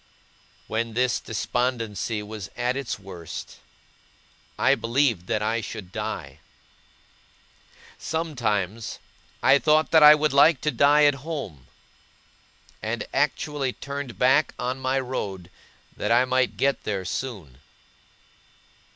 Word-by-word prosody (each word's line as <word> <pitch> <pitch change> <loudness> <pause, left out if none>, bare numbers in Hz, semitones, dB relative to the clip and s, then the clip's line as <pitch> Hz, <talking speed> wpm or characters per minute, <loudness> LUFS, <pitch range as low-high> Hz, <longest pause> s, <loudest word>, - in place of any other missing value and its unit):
When 115 +1 -2
this 125 0 +1
despondency 115 -2 -2
was 105 -2 -7
at 125 +1 0
its 135 -3 -3
worst, 90 -4 -9 1.0
I - - +4
believed 115 -6 0
that 110 -2 -1
I 115 +2 0
should 105 -5 -8
die. 110 +1 -5 1.6
Sometimes, 115 - -2 0.5
I 140 - +6
thought 155 +1 +3
that 160 - +6
I 150 0 +10
would 150 -1 0
like 140 +1 +6
to 150 - 0
die 145 +4 +4
at 145 - +5
home; 135 - -6 1.1
and - - -3
actually 140 -4 0
turned 140 -3 -6
back 130 +4 +3
on 125 +2 -3
my 130 +1 0
road, 100 -9 -5 0.4
that 105 - -2
I 120 +2 +5
might 130 0 0
get 140 -2 +1
there 100 -3 -3
soon. 95 - -5
125 Hz, 115 wpm, -25 LUFS, 105-140 Hz, 1.6 s, I